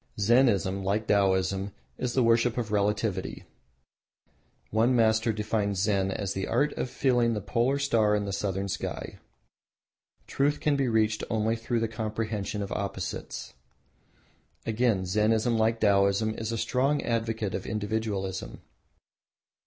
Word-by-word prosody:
Zennism, 100 -4 +3
like 105 +3 0
Taoism, 95 -1 +1 0.3
is 125 -1 -2
the 130 - +3
worship 115 +1 +3
of 115 -3 -2
Relativity. 105 0 -1 1.3
One 115 +4 +3
master 110 0 +3
defines 105 -2 -1
Zen 100 -1 +1
as 95 0 -3
the 95 - -3
art 145 +1 +1
of - - -3
feeling 120 -3 +2
the - - -1
polar 120 +7 0
star 115 -7 +2
in 105 -1 -1
the 100 - -4
southern 100 0 -2
sky. 95 - -5 1.1
Truth 145 +2 0
can 150 -1 +1
be 135 -2 +1
reached 110 -2 +1
only 110 +1 +1
through 115 0 -2
the 115 - +1
comprehension 110 -2 -3
of 100 - -7
opposites. 100 -8 -4 1.1
Again, 110 -3 +1
Zennism, 110 +5 +2
like 115 +1 +1
Taoism, 100 +1 +3
is 110 0 -4
a 115 - -2
strong 135 +5 +1
advocate 115 -3 -1
of - - -4
individualism. 105 -3 -3
110 Hz, 135 wpm, -28 LUFS, 100-115 Hz, 1.3 s, Zennism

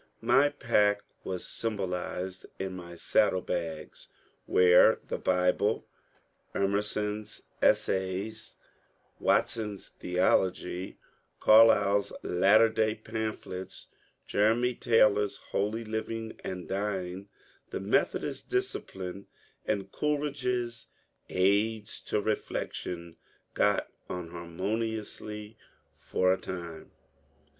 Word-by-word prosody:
My 145 +1 +5
pack 105 -7 +2 0.2
was 90 -2 -4
symbolized 95 -3 -3
in 95 -1 -4
my 85 -1 -9
saddle 90 +2 +2
bags, 80 -3 -4 0.4
where 90 -1 +6
the - - -3
Bible, 90 0 +1 0.7
Emerson's 105 +1 -1 0.2
^^ - - +8
Essays," 95 +4 0 0.6
Wat - - +3
son's 105 -3 -6
" - - -39
Theology," 90 0 0 0.4
Carlyle's 105 -2 +6
Latter 100 +5 +5
Day 110 0 +1
Pamphlets," 110 -4 -5 0.4
Jeremy 115 +4 +2
Taylor's 105 -4 +3
" - - -21
Holy 110 +3 -1
Living 110 +1 -4
and 90 -2 -5
Dying," 95 -1 -3 0.4
the - - -4
Methodist - - 0
Discipline, 100 - -3 0.4
and 100 -2 -1
Coleridge's 135 -5 -1
^^ - - -41
Aids 105 +3 +1
to 105 - 0
Beflection 85 -5 -3 0.2
" - - -38
got - - +2 0.2
on 90 -2 -5
harmoniously, 105 +4 -4 0.2
— - - -41 0.2
for 95 0 +3
a 95 - -3
time. 85 -3 -7
100 Hz, 100 wpm, -29 LUFS, 90-110 Hz, 0.7 s, ^^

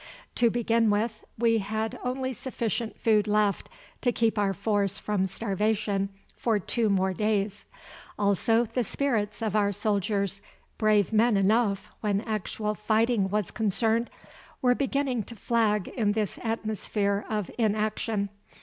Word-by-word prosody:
To 240 -1 +3
begin 230 -1 +2
with, 215 +2 0
we 230 0 +3
had 215 +2 -3
only 260 +1 -2
sufficient 230 -3 -3
food 215 -2 +3
left 210 -1 +1 0.3
to 245 - +2
keep 225 -2 +1
our 200 -1 +2
force 200 -1 0
from 200 -2 0
starvation 200 0 -1 0.3
for 225 -3 +1
two 220 +3 0
more 190 -1 +2
days. 210 0 -1 0.5
Also 210 +3 +2
the 235 +2 -1
spirits 225 -3 -1
of 215 -2 -1
our 205 -1 +3
soldiers, 200 -1 -1 0.4
brave 215 -1 +3
men 220 0 +4
enough 200 0 +2
when 205 -2 +1
actual 215 -1 -2
fighting 215 -1 +1
was 210 -2 -1
concerned, 220 +2 +1 0.5
were 250 -1 +4
beginning 270 -2 0
to 235 - -7
flag 215 -2 +1
in 210 -4 0
this 215 -3 -2
atmosphere 215 -2 -1
of 210 -4 -2
inaction. 215 -1 0
215 Hz, 135 wpm, -27 LUFS, 200-230 Hz, 0.5 s, men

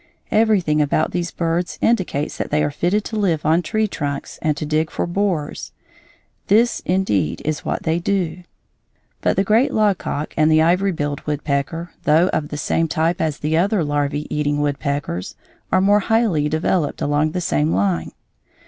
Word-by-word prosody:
Everything 200 -9 +3
about 150 +2 +1
these 175 -1 -2
birds 170 +1 -2
indicates 185 -10 0
that - - -3
they 150 +1 +1
are 145 - 0
fitted 180 +8 0
to 220 - -6
live 175 -8 0
on 160 +3 +3
tree 215 +4 0
trunks 140 -6 -5
and 150 -2 0
to 155 - -3
dig 155 +1 0
for - - -2
borers. 175 -4 -2 0.7
This, 230 +4 +3
indeed, 105 - 0
is 155 0 -2
what - - -3
they 165 +1 +1
do. 180 -2 -1 0.8
But - - +1
the 195 - +2
great 220 +6 +3
logcock 200 -8 0
and 155 0 +3
the 155 - +5
ivory 180 +4 +2
billed 145 -3 -3
woodpecker, 150 +3 -2
though 160 +5 +4
of 150 - -1
the 150 - -6
same 165 +3 0
type 165 +2 0
as 155 -3 -1
the 155 +1 -1
other 195 +1 +2
larvæ 145 0 -1
eating 145 -1 0
woodpeckers, 140 - -2 0.4
are 185 - +4
more 205 +2 +4
highly 205 -9 +1
developed 160 0 0
along 145 +2 +1
the 180 - -1
same 75 - +1
line. 90 -3 0
160 Hz, 170 wpm, -20 LUFS, 145-185 Hz, 0.8 s, the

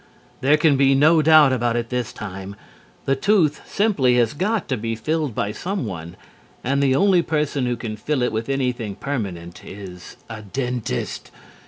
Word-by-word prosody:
There 145 +3 +4
can 155 -3 +3
be 135 0 +4
no 155 +4 +5
doubt 155 -3 +6
about 120 -2 0
it 120 -1 -2
this 125 -2 -2
time. 95 -1 -8 0.5
The 135 - +2
tooth 160 -1 +2
simply 190 - +2
has 120 -2 +2
got 200 +5 -1
to 130 - +1
be 115 0 -3
filled 150 +1 -2
by 100 - -1
someone, 105 - -5 0.5
and 140 +2 0
the 135 -2 +3
only 190 +1 +4
person 150 -5 -1
who 120 - 0
can 110 -2 -5
fill 130 +4 -1
it 125 - 0
with 110 +3 -3
anything 125 -6 -2
permanent 95 -11 -5
is 95 -3 -10
a 110 -1 -8
dentist. 120 - -4
130 Hz, 170 wpm, -22 LUFS, 110-150 Hz, 0.5 s, doubt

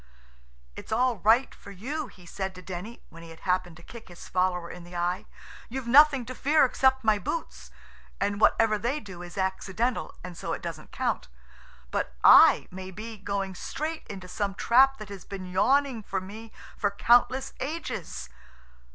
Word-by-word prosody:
"It's - - -10
all 245 +1 +2
right 225 +7 +3
for - - -14
you," 260 +10 -5
he 180 -6 -17
said 190 +2 -5
to 180 - -11
Denny, 185 +6 -7
when 165 - -12
he 165 - -11
had 165 - -13
happened 180 -2 -1
to 175 - -15
kick 235 +3 -12
his 175 -1 -12
follower 180 -1 0
in 175 - -10
the 175 +1 -12
eye. 180 +4 -1 0.4
"You've 260 +1 -5
nothing 275 +1 +6
to 255 - -6
fear 290 +3 +3
except 265 0 +2
my 215 -2 +3
boots, 325 - -5 0.5
and 200 +1 -1
whatever 215 -2 +4
they 245 +7 -1
do 190 -7 -10
is 175 +2 -10
accidental, 190 +5 -2
and 180 -1 -8
so - - -4
it - - -5
doesn't - - -7
count, 70 - -2 0.6
but 65 - -2
I - - +8
may 185 +1 -7
be 220 +4 -8
going 195 -1 -3
straight 310 - -5
into 190 -2 -8
some 200 +1 -3
trap 270 +5 +4
that 215 -2 -9
has 195 -3 -9
been 195 -2 -7
yawning 255 +7 +2
for 195 -2 -3
me 215 +4 -10 0.2
for 205 - 0
countless 245 +6 +3
ages." 255 - -5
205 Hz, 175 wpm, -27 LUFS, 185-250 Hz, 0.6 s, I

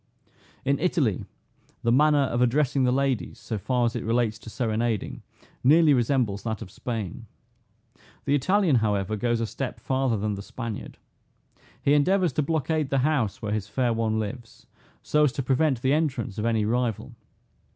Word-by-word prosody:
In 140 +1 +1
Italy 150 - 0 0.6
the 115 - +2
manner 145 +2 +4
of 120 -2 -1
addressing 135 +1 +2
the 125 - +3
ladies, 135 -2 0
so 110 0 -5
far 125 +3 +1
as 115 - -1
it - - -3
relates 115 -2 0
to 110 - -10
serenading, 115 -2 -2 0.4
nearly 155 +3 +6
resembles 120 -5 +1
that 110 -1 -4
of 95 - -12
Spain. 110 -7 -5 1.0
The 140 - +1
Italian, 180 0 +3
however, 105 -2 0
goes 120 +2 0
a - - +1
step 130 +4 -5
farther 130 -3 0
than 105 +1 -1
the 100 - -5
Spaniard. 115 +1 -7 0.9
He 140 - +4
endeavors 175 +2 +3
to 150 - +1
blockade 155 -1 0
the 135 -1 +1
house 130 -10 0
where 105 - -2
his 105 -2 -2
fair 120 +2 0
one 110 -1 0
lives, 115 +2 -6 0.4
so 150 0 +3
as 140 - +2
to 135 - -3
prevent 135 -1 +1
the 135 +1 +3
entrance 130 -10 -1
of 105 - -1
any 115 -2 +1
rival. 120 -1 -1
125 Hz, 170 wpm, -26 LUFS, 110-140 Hz, 1.0 s, nearly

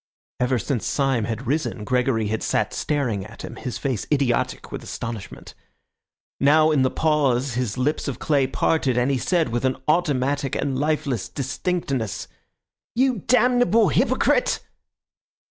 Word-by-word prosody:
Ever 125 +1 +2
since 120 +1 -2
Syme 135 -6 +1
had 115 -2 -4
risen 135 -5 -1
Gregory 125 -2 +1
had 110 0 -2
sat - - 0
staring 125 -10 -1
at 110 +3 -11
him, - - -7
his 125 -4 -5
face 130 -7 -2
idiotic 135 -5 0
with - - -5
astonishment. 115 -4 -7 0.9
Now 155 +3 +5
in 145 -3 +3
the 130 - +3
pause 140 -4 +1
his 125 -2 -2
lips 145 +5 0
of 140 - -3
clay 140 -4 +1
parted, 135 -1 +1
and 125 +3 +2
he 135 - 0
said, 170 -4 +1
with 120 +2 -2
an 130 0 +1
automatic 145 -4 +1
and 135 -2 -1
lifeless 145 -7 -1
distinctness— 135 - -2 0.7
"You 255 -2 +2
damnable 245 -3 +4
hypocrite!" 130 - +2
135 Hz, 145 wpm, -23 LUFS, 120-155 Hz, 0.9 s, Now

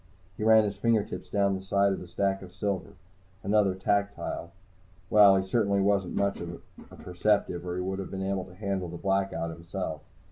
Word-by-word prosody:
He - - -5
ran 110 0 +6
his 100 -2 -3
fingertips 115 -2 0
down 100 -1 +2
the 95 - -3
side 100 +1 +2
of - - -4
the 90 - -9
stack 95 +2 -1
of 90 -1 -12
silver. 100 -1 -3 0.5
Another 100 -1 +2
tactile. 100 -2 -1 0.6
Well, 105 -2 +8
he 95 - 0
certainly 100 -1 +1
wasn't 100 -2 +1
much 100 0 0
of 85 0 -6 0.3
a - - -13
perceptive, 90 -1 0
or 90 - -3
he 90 - -2
would 95 +1 -3
have 95 - -5
been 95 0 -4
able 95 -1 -1
to 90 -1 -14
handle 95 -3 -3
the 85 - -7
Blackout 95 -3 -1
himself. 85 -1 -5
95 Hz, 190 wpm, -28 LUFS, 90-100 Hz, 0.6 s, Well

